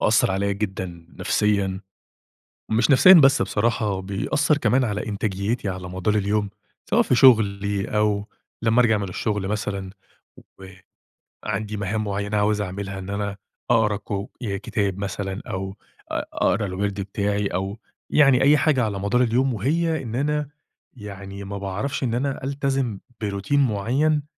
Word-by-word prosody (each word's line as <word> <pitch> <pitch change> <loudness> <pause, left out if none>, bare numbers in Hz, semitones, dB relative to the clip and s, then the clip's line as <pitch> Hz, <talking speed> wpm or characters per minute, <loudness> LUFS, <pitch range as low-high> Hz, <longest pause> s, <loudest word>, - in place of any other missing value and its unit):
ومأثر 110 -2 +3
عليَّ 100 +1 0
جدًا 95 -4 -5
نفسيًا، 100 -2 +1 0.9
مش 115 +6 +3
نفسيًا 185 +8 +8
بس 135 -5 +6
بصراحة، 105 -2 0
بيأثر 120 +10 0
كمان 130 -1 +2
على 105 -3 -2
إنتاجيتي 100 +1 -2
على 90 -1 -6
مدار 95 +4 -1
اليوم، 105 0 0 0.4
سواء - - +4
في - - +2
شغلي 100 -5 +4
أو 105 -1 +1 0.3
لمّا 115 +2 +4
أرجع 110 -3 +3
من 100 -2 -3
الشغل 105 +1 -2
مثلًا، 100 -2 -3 1.5
وعندي 105 0 -3
مهام 105 +2 -2
مُعيّنة 100 +1 -2
عاوز 105 0 +2
أعملها 95 0 -5
إن 95 0 -8
أنا 100 0 -3 0.3
أقرا 105 -2 +3
كُ 100 - -14 0.3
ي 100 -5 -3
كِتاب 100 -4 -2
مثلًا 100 -1 -4
أو 95 +1 -4 0.4
أ - - 0
أقرا 105 +1 +1
الوِرد 100 +1 -2
بتاعي 100 +1 -1
أو 100 +3 -3 0.3
يعني 135 -4 +5
أي 145 +2 +6
حاجة 140 -4 +2
على 100 -2 -3
مدار 120 +6 +2
اليوم 125 +3 +1
وهي 160 - 0
إن 115 -2 -5
أنا 150 +2 -1 0.5
يعني 100 -2 -8
ما 100 +1 -6
باعرفش 100 +9 -3
إن 120 -3 0
أنا 135 +2 -2
ألتزم 135 -6 -1 0.2
بروتين 100 +7 0
مُعيّن 135 +7 +1
105 Hz, 145 wpm, -23 LUFS, 100-120 Hz, 1.5 s, نفسيًا